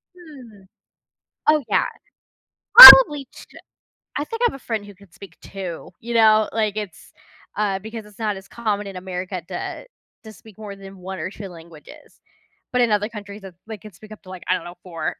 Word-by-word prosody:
Hmm, 265 - -17 0.9
oh, 305 -1 +2
yeah, - - 0 0.9
probably 300 - +11
ch - - -16 0.7
I 290 - -3
think 455 +9 -9
I - - +3
have - - -12
a - - -13
friend 220 -3 -6
who 205 -2 -15
could 200 -3 -23
speak 195 +1 -16
2. 185 -4 -10
You 235 +1 -8
know, 220 -1 +2
like, 215 -2 -3
it's, 200 -7 -10 0.5
uh 200 -2 -3
because 220 +1 -11
it's 210 +1 -21
not 210 -2 -3
as 190 - -15
common 210 -3 -5
in 195 - -11
America 185 0 -8
to - - -8 0.4
to 220 - -13
speak 215 +1 -20
more 210 -2 -11
than 195 0 -15
1 190 0 -10
or 170 - -6
2 200 0 -11
languages, 165 -2 -17 0.5
but 250 - 0
in 235 -3 0
other 210 0 -1
countries, 205 -1 -12
th 185 - -16
they 220 - -9
can 210 -1 -16
speak 215 +4 -18
up 215 - -14
to, 185 - -17
like, 185 -1 -12
I 185 - 0
don't - - -9
know, 175 +1 -12
4. 170 -3 -7
210 Hz, 200 wpm, -19 LUFS, 190-225 Hz, 0.9 s, probably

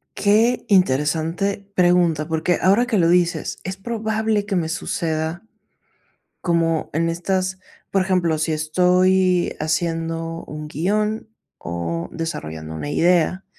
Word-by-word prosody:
Qué 225 +4 +2
interesante 175 +3 +1
pregunta, 175 -4 +3
porque 160 +2 0
ahora 200 +7 +4
que 240 -4 0
lo 170 -3 +4
dices, 175 -1 +1
es 190 +1 -5
probable 220 -1 -1
que 200 -2 -2
me 165 -3 0
suceda, 160 +1 -2 1.0
como 165 -2 0
en 165 +2 +1
estas, 185 +2 -1 0.3
por 195 -1 +2
ejemplo, 180 -4 +1
si 155 +1 0
estoy 180 +3 +2
haciendo 165 +1 -2
un 150 0 -7
guion 210 +8 -1 0.3
o 85 0 -4
desarrollando 80 - -5
una 145 - -5
idea, 175 +3 +2
175 Hz, 120 wpm, -21 LUFS, 160-190 Hz, 1.0 s, ahora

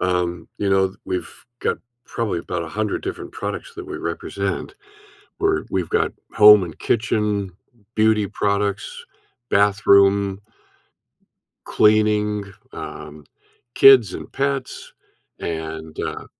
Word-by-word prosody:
Um, 90 -1 -1
you 100 - -1
know, 95 0 +3
th 95 - -18
we've 90 -1 -3 0.3
got - - -1 0.3
probably 115 -8 -3
about 85 0 -4
100 105 +6 -3
different 380 - -6
products - - -5
that 385 -1 -8
we 365 - -4
represent. 370 +2 -4 0.7
We're 395 -1 +1
we've - - -1
got 450 0 +1 0.2
home 105 -2 +8
and 85 -3 -8
kitchen, 105 -4 0 0.5
beauty 110 -1 +3
products, 100 0 -1 0.6
bathroom 100 -1 +3 1.3
cleaning, 105 -1 +2 0.3
um 75 0 -9 0.5
kids 130 -8 +7
and - - -8
pets, 135 -1 -3 0.5
and 80 -1 -6
uh - - -4
105 Hz, 110 wpm, -21 LUFS, 95-110 Hz, 1.3 s, home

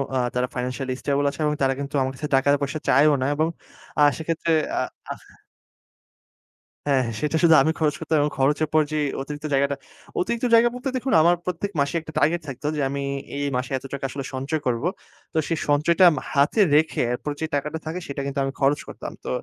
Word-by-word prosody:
আ - - +2 0.2
তারা 125 0 0
ফাইন্যান্সিয়ালই 125 +1 -3
স্টেবল 145 0 0
আছে 140 - -10
এবং 150 - +1
তারা 135 -1 +3
কিন্তু 140 +1 -5
আমার 130 - 0
কাছে 150 - -4
টাকা-পয়সা 140 +2 +1
চায়ও 145 +3 +5
না - - +1
এবং 155 +2 +1 0.5
আ - - +5 0.2
সেক্ষেত্রে 165 +1 -2 0.3
আ - - +2 0.3
আহ - - -7 1.7
হ্যাঁ। 135 -2 +3 0.2
সেটা 150 +1 0
শুধু 165 -1 +7
আমি 160 - +2
খরচ 155 -1 +1
করতাম 160 - 0
এবং 145 0 +1
খরচের 145 +3 +2
পর 155 - +5
যে 155 - -1 0.2
অতিরিক্ত 145 +2 -6
জায়গাটা 140 +1 +2 0.4
অতিরিক্ত 235 +6 -1
জায়গা 230 +1 +6
বলতে, 250 +2 -3
দেখুন 255 +1 -2
আমার 170 +2 +5
প্রত্যেক 180 +3 -3
মাসে 140 +4 0
একটা 155 - -10
টার্গেট 165 +4 +2
থাকতো 135 +2 -5
যে 150 - -1
আমি 140 0 -3 0.3
এই 145 - -1
মাসে 125 - -4
এত 130 - -10
টাকা 140 - -3
আসলে 135 -1 -5
সঞ্চয় 140 +4 -2
করব। 120 -1 0 0.5
তো 160 - -2
সেই 165 -2 -1
সঞ্চয়টা 165 +5 +4
মা 175 - +8
আমি - - 0
হাতে 145 +9 +2 0.2
রেখে 155 +1 +2
এরপর 145 +4 -4
যে 160 - +1
টাকাটা 150 +3 -2
থাকে 160 +3 -3
সেটা 140 0 -4
কিন্তু 140 0 -3
আমি 135 - -2
খরচ 140 +2 +3
করতাম। - - -7
তো - - -5
145 Hz, 205 wpm, -24 LUFS, 140-160 Hz, 1.7 s, মা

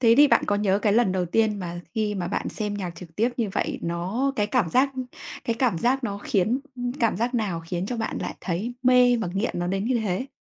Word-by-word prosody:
thế 230 -2 +6
thì 290 0 +8
bạn - - +4
có 205 - +2
nhớ 200 -1 +2
cái 205 - +3
lần 220 -4 +3
đầu 180 -1 0
tiên 215 +3 +2
mà 175 -2 -5
khi 210 -2 0
mà 180 -3 -2
bạn - - -2
xem 210 -2 -3
nhạc 190 -3 -3
trực 165 -3 -12
tiếp 230 +3 +3
như 225 -4 0
vậy - - -1
nó 185 +11 -1
cái 210 -2 +2
cảm 220 -5 +1
giác 265 +6 +3 0.5
cái 230 - 0
cảm 230 -10 +2
giác 255 +5 +1
nó 200 -3 -3
khiến 215 +6 +1 0.2
ừm, 245 0 -2
cảm 230 -6 +2
giác 240 +4 -1
nào 195 -8 -1
khiến 175 +2 -3
cho 245 +2 -3
bạn 225 - -2
lại - - -4
thấy 205 +7 -3
mê 250 -1 +5
và 215 -6 -2
nghiện 195 0 -1
nó 175 - -1
đến 195 +3 -1
như 245 -1 +1
thế? 210 +4 -1
210 Hz, 255 wpm, -25 LUFS, 185-245 Hz, 0.5 s, thì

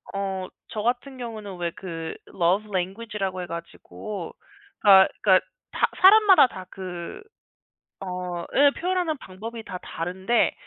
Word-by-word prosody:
어 190 -1 -3 0.2
저 215 - -4
같은 250 +4 -2
경우는 215 -6 -6
왜 175 -1 -1
그 165 -5 -6
Love 185 +4 +1
Language 195 +4 -3
라고 190 -1 -2
해 180 - -4
가지고 170 +3 -7 0.5
다 190 -2 +8
그러니까 190 -3 +5 0.3
사 - - +2 0.2
사람마다 390 -5 +8
다 185 -6 -9
그 185 - -7 0.8
어 180 -2 -4
예 285 +1 +6
표현하는 355 -4 0
방법이 225 +4 -8
다 185 -4 -7
다른데 190 +7 0
195 Hz, 290 characters per minute, -25 LUFS, 180-235 Hz, 0.8 s, 다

